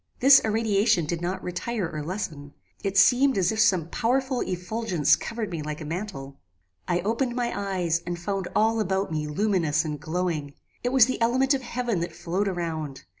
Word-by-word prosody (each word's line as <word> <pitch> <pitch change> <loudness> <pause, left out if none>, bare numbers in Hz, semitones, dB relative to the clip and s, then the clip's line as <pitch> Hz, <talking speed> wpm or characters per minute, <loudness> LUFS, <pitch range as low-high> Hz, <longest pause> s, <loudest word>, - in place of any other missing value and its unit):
This 270 +1 +8
irradiation 215 -4 +2
did 170 +2 -3
not 180 +2 -3
retire 190 +2 -3
or 155 -2 -5
lessen. 150 -4 -5 0.3
It 195 0 -1
seemed 255 +6 +5
as 180 -2 +2
if 220 - -3
some 185 -7 +3
powerful 255 +5 0
effulgence 180 -4 +1
covered 225 -3 -5
me 165 -3 -3
like 150 0 -5
a 155 - -7
mantle. 150 -5 -6 0.5
"I 175 0 +1
opened 235 +5 -1
my 240 -1 -1
eyes 185 -4 -1
and 175 0 -4
found 190 +1 -3
all 225 +1 +3
about 195 -3 -1
me 155 -1 -2
luminous 160 -3 +1
and 150 -2 -4
glowing. 160 -3 -3 0.3
It 245 - +1
was 260 -3 +7
the 255 -1 -3
element 260 +4 +3
of 270 - -1
heaven 240 -5 -2
that 170 - -4
flowed 190 +4 -2
around. 160 -6 -4
190 Hz, 180 wpm, -26 LUFS, 165-225 Hz, 0.5 s, This